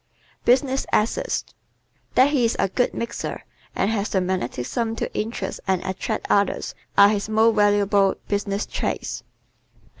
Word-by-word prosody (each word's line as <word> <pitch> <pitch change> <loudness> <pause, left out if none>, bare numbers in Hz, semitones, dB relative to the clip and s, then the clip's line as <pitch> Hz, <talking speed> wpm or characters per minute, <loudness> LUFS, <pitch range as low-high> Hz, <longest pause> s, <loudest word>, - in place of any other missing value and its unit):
Business 265 +2 +2
Assets - - 0
¶ - - -24 0.6
That 265 +3 +5
he 275 -5 +2
is 230 - +2
a 195 - +1
"good 245 +6 +1
mixer" 235 - -4 0.3
and 195 - +1
has 210 -1 -1
the 190 - +1
magnetism 185 - -2
to - - -4
interest 210 -3 -3
and 190 -1 +2
attract 190 +3 -3
others 200 0 +1 0.2
are 200 0 +8
his 210 0 -1
most 220 +1 +4
valuable 205 -2 +3
business 200 0 -1
traits. - - -3
210 Hz, 145 wpm, -23 LUFS, 200-230 Hz, 0.6 s, are